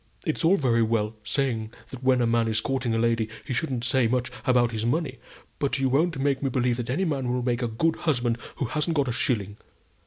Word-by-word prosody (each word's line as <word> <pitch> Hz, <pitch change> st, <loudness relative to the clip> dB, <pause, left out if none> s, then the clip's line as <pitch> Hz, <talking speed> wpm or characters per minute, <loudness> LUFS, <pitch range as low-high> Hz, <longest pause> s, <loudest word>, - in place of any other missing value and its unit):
It's 155 Hz, -1 st, -1 dB
all 180 Hz, +5 st, +5 dB
very 120 Hz, -5 st, +2 dB
well 110 Hz, -1 st, 0 dB
saying 115 Hz, -3 st, -1 dB, 0.2 s
that 130 Hz, -, -8 dB
when 130 Hz, -1 st, +3 dB
a -, -, +3 dB
man 115 Hz, 0 st, +2 dB
is 110 Hz, 0 st, +2 dB
courting 130 Hz, -2 st, -1 dB
a -, -, +1 dB
lady, 115 Hz, -1 st, +1 dB, 0.2 s
he 130 Hz, -, -3 dB
shouldn't 130 Hz, -4 st, -1 dB
say 125 Hz, 0 st, +2 dB
much 125 Hz, +1 st, -1 dB, 0.2 s
about 120 Hz, -2 st, +4 dB
his 110 Hz, -1 st, -3 dB
money; 135 Hz, +1 st, -1 dB, 0.4 s
but 140 Hz, -2 st, +1 dB
you 135 Hz, -1 st, +1 dB
won't 155 Hz, +4 st, +2 dB
make 135 Hz, 0 st, 0 dB
me 135 Hz, -, 0 dB
believe 125 Hz, -2 st, +1 dB
that 120 Hz, -1 st, -4 dB
any 155 Hz, +10 st, 0 dB
man 135 Hz, -6 st, -1 dB
will 125 Hz, 0 st, -1 dB
make 120 Hz, 0 st, 0 dB
a 120 Hz, -, 0 dB
good 160 Hz, +9 st, 0 dB
husband 120 Hz, -7 st, 0 dB, 0.2 s
who 135 Hz, -, -2 dB
hasn't 150 Hz, +7 st, -1 dB
got 140 Hz, -4 st, +1 dB
a -, -, -1 dB
shilling. 105 Hz, -5 st, -1 dB
125 Hz, 230 wpm, -26 LUFS, 115-135 Hz, 0.4 s, all